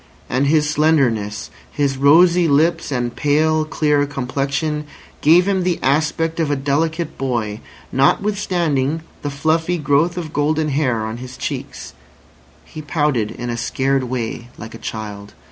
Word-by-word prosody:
And 130 +3 +2
his 150 0 +3
slenderness, 135 -9 +1 0.2
his 140 -2 0
rosy 170 +5 +5
lips 160 +2 +2
and 120 -2 -2
pale, 155 +2 +2
clear 150 -2 +1
complexion, 140 +3 -2 0.4
gave 170 +5 +5
him 195 -2 +1
the 180 -1 0
aspect 160 +4 +1
of 160 -3 +1
a 145 - +1
delicate 155 +4 -1
boy, 115 -5 -2 0.3
notwithstanding 160 -2 +1 0.2
the 145 - -3
fluffy 160 +5 0
growth 150 +4 +1
of 160 -3 -5
golden 155 +1 +1
hair 130 -6 0
on 110 +1 -5
his 125 +1 -9
cheeks. - - -5 0.7
He 155 - -9
pouted 145 -8 0
in 120 +2 -5
a 120 - -3
scared 130 +3 0
way 120 -1 -4
like 110 0 -9
a 115 - -9
child. 105 -2 -7
145 Hz, 145 wpm, -19 LUFS, 130-160 Hz, 0.7 s, rosy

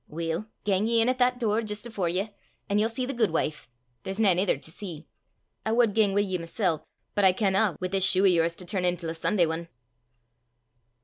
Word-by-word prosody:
"Weel, 165 +5 -3 0.2
gang 200 +1 +1
ye 230 0 +3
in 225 +2 +3
at 255 0 -1
that 250 0 +2
door 220 -2 +1
jist 210 0 -4
afore 205 -7 -2
ye, 195 +5 -2 0.4
an' 200 +1 +1
ye'll 220 +2 +2
see 250 +2 -3
the 275 - -4
guidwife 165 - -1 0.3
there's 190 - -5
nane 190 -5 +4
ither 185 -6 +2
til 160 +3 -8
see. 175 -6 -8 0.6
I 220 - -1
wad 230 -3 +3
gang 205 -3 +2
wi' 205 - +4
ye 185 -3 -2
mysel', 165 -1 -1 0.3
but 205 - +1
I 190 -1 +6
canna, 195 0 +1
wi' 185 - -2
this 190 0 +1
shue 190 0 +4
o' - - +5
yours 170 -3 +3
to 180 - -9
turn 185 0 -2
intil 175 -2 -1
a - - -4
Sunday 175 +2 +2
ane!" 165 +1 -3
195 Hz, 215 wpm, -27 LUFS, 175-220 Hz, 0.6 s, I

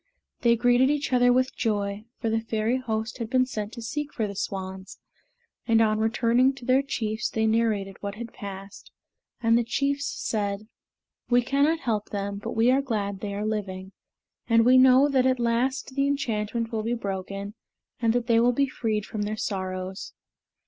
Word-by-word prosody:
They 235 -1 +4
greeted 245 +3 +4
each 290 -2 -1
other 245 0 +5
with 255 +1 +1
joy, 205 -2 -1
for 225 - -1
the 225 - +2
Fairy 225 +2 0
Host 225 -1 -3
had 230 -2 -4
been 255 +1 +3
sent 215 -4 -5
to 235 - -7
seek 295 +6 -4
for 220 - -2
the 200 -1 -6
swans; 190 0 -5 0.7
and 225 -1 +4
on 215 -1 +3
returning 235 +4 +3
to 250 -3 -11
their 260 +2 +4
chiefs 220 -6 -2
they 220 0 0
narrated 220 -3 0
what 200 0 -4
had 230 +1 -8
passed, 195 0 -9 0.5
and 230 0 +4
the 235 - +3
chiefs 280 +4 -1
said, 205 -1 -3 0.6
"We 245 0 +4
cannot 285 +6 +2
help 220 -5 -2
them, 200 0 -3
but - - -5
we 230 +3 +4
are 270 +2 +3
glad 205 -7 -2
they 200 0 -4
are 205 +1 -3
living; 190 -3 -4 0.6
and 230 0 +5
we 255 +1 +7
know 260 +2 +6
that 260 -2 +2
at 255 -1 +1
last 245 +3 0
the 275 +1 +1
enchantment 230 -4 -1
will 220 -2 -1
be 230 +2 -1
broken 195 -1 -5 0.5
and 230 -1 +3
that 245 -1 0
they 230 -1 +4
will 245 +1 +4
be 275 +3 +2
freed 220 -5 -2
from 215 - -5
their 210 +1 -2
sorrows." 185 -1 -4
225 Hz, 185 wpm, -26 LUFS, 205-255 Hz, 0.7 s, we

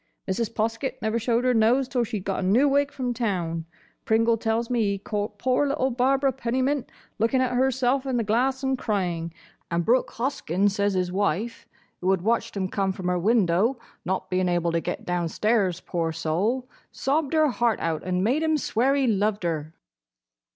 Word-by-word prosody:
Mrs. 215 +4 -1
Poskett 230 +4 -2
never 220 0 -1
showed 235 +1 +1
her 255 0 +3
nose 240 +4 +3
till 250 -2 0
she 225 -2 -3
'd - - -11
got 195 - -1
a 185 - -1
new 245 +9 +4
wig 285 +1 +2
from 250 -2 -2
town; 175 -9 -2 0.4
Pringle 230 +1 +3
tells 225 +1 -1
me 240 -1 0
he 200 -2 +1
caught 205 +1 -4
poor 255 +5 +1
little 270 -2 0
Barbara 265 +2 +2
Pennymint 260 +2 -1 0.3
looking 230 +4 +2
at 255 -1 +1
herself 260 +1 +1
in 255 -2 0
the 230 - +1
glass 255 +5 +1
and 265 -1 0
crying; 175 -5 -1 0.4
and 170 0 -1
Brooke 250 +3 +3
Hoskyn 205 - 0
says 200 0 0
his 180 -1 0
wife, 205 +4 -1 0.3
who 185 - -1
had 190 -2 +2
watched 230 0 0
'em 190 -1 0
come 195 0 -1
from 185 -2 -3
her 180 0 +1
window, 210 +3 +2 0.3
not 190 +1 -2
being 185 0 +1
able 175 -1 +1
to 165 0 0
get 175 - -4
downstairs, 180 +2 0
poor 165 -2 -2
soul, 185 +11 -1 0.2
sobbed 285 +2 -1
her 310 -1 +4
heart 240 -2 +1
out 165 -2 -1
and 180 0 -1
made 255 +9 +2
him 315 -1 +2
swear 265 0 +1
he 275 -1 +2
loved 210 -2 +1
her." 160 -2 -3
225 Hz, 190 wpm, -25 LUFS, 185-255 Hz, 0.4 s, new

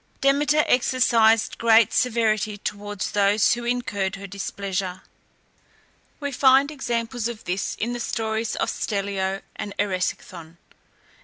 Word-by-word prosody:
Demeter 290 +2 +3
exercised 230 -3 +3
great 225 -1 +5
severity 215 -3 +1
towards 205 -1 -5
those 205 +1 +3
who 240 0 -4
incurred 230 -6 -1
her 195 0 -9
displeasure. 195 -1 -4 1.2
We 285 -1 -3
find 270 +2 +4
examples 235 -4 -2
of 235 -2 -7
this 180 +2 -2
in 235 +3 -3
the 240 - -4
stories 220 -1 -2
of - - -1
Stellio 195 -1 -2
and 200 -1 -6
Eresicthon. 185 -4 -3
220 Hz, 120 wpm, -24 LUFS, 200-240 Hz, 1.2 s, great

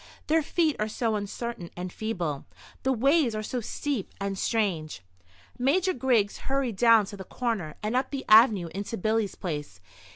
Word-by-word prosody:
Their 320 +1 +3
feet 315 -1 +1
are 215 - 0
so 220 +1 -1
uncertain 205 -2 -5
and 180 0 -5
feeble; 175 -10 -3 0.4
the 265 - +1
ways 265 0 +3
are 215 - -3
so 245 +3 -3
steep 260 -1 -3
and 200 0 -2
strange. 185 - -1 0.6
Major 355 +9 +2
Griggs 240 -6 +1
hurried 265 -6 0
down 230 -1 +6
to 205 +1 -9
the 190 - -7
corner, 200 -8 -3
and 215 +3 -1
up 255 - +1
the 275 -2 -5
avenue 215 -5 +6
into 200 +4 -4
Billy's 215 0 0
place. 150 - -5
220 Hz, 165 wpm, -27 LUFS, 195-255 Hz, 0.6 s, down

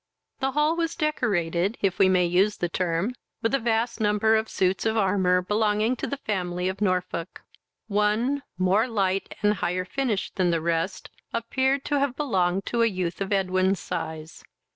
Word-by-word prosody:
This 270 -1 -1
hall 300 +2 +2
was 335 0 -1
decorated, 200 - 0
if 190 -2 0
we 190 - +6
may 180 -1 +3
use 190 +4 +2
the 175 - -1
term, 175 +5 -1 0.3
with 225 - +1
a 275 - +3
vast 230 0 0
number 210 +1 +3
of 220 0 0
suits 185 0 0
of 220 0 0
armour, 185 -3 +2
belonging 210 +4 +1
to - - -3
the 280 - -3
family 180 -7 -2
of 190 +2 -4
Norfolk. 185 -3 -2 0.4
One, 215 +6 +1 0.2
more 190 +6 +2
light 195 -4 -1
and 205 0 +4
higher 180 -2 -2
finished 230 -3 -2
than 185 -2 +2
the 170 -1 +1
rest, 170 +3 -2 0.2
appeared 265 +4 0
to 290 - +1
have 275 -2 0
belonged 195 -10 0
to 235 - 0
a 230 - +5
youth 185 -4 -3
of 195 - -2
Edwin's 190 -1 +1
size. 160 0 -6
200 Hz, 175 wpm, -25 LUFS, 180-230 Hz, 0.4 s, we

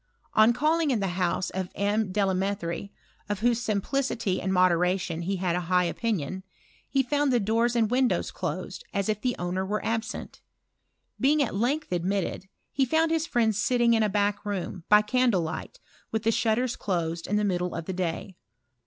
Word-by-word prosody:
On 215 +2 +6
calling 310 +4 +2
at 240 - +1
the 195 -1 -1
house 180 +1 -1
of 185 -1 -3
M. 205 0 0
Delametherie, 195 -2 -1 0.4
of 205 0 -2
whose 240 0 +2
simplicity 220 -2 -1
and 190 - -1
modera 180 0 +3
tion 170 -2 -4
he 190 +3 -1
had 180 -2 0
a - - +1
high 180 -1 +4
opinion, 190 - -2 0.5
he 270 0 +2
found 290 +1 +1
the 245 - +3
doors 230 +3 +1
and 225 -2 +2
windows 255 0 +1
closed, - - -5
as 200 +1 0
if 210 -1 -1
the 250 -1 0
owner 180 +2 -2
were 205 +2 -2
absent. 225 0 -3 0.8
Being 290 +2 +4
at 245 - -3
length 250 +8 -1
admitted, 185 +2 -1 0.2
he 270 - +1
found 320 +5 +2
his 325 0 0
friend 225 -6 +2
sitting 235 +3 +3
in 225 - +3
a 215 - +2
baclc 205 0 0
room, 190 -3 -4
by 210 0 +7
candle 240 -3 +2
light, 165 - -5 0.3
with 220 -1 -1
the 225 - +3
shutters 235 +2 +1
closed 170 -3 -2
in 210 - 0
the 210 - +2
middle 180 -3 -1
of 165 - -4
the 190 - -3
day. 180 0 -3
205 Hz, 185 wpm, -27 LUFS, 185-240 Hz, 0.8 s, by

